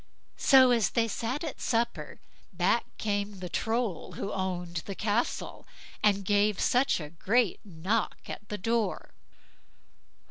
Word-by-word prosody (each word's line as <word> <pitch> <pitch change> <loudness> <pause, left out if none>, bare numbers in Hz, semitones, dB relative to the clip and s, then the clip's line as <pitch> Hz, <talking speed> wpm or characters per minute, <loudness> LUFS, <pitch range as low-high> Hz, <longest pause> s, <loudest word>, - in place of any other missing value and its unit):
So 260 -2 +6
as 225 -8 +3
they 230 -1 +1
sat 235 +7 -3
at 315 - -5
supper, 235 -1 -1 0.3
back - - +1
came 205 -1 -2
the 180 -1 -6
Troll 225 -2 -2
who 200 - -4
owned 180 -3 -3
the 195 - -4
castle, 215 +4 -2 0.3
and 200 -2 +2
gave 205 0 +2
such 250 -3 +2
a 150 -2 -7
great 205 +5 +1
knock 195 +4 -1
at 210 - -8
the 210 - -3
door. 225 +2 -1
210 Hz, 135 wpm, -29 LUFS, 190-230 Hz, 0.3 s, So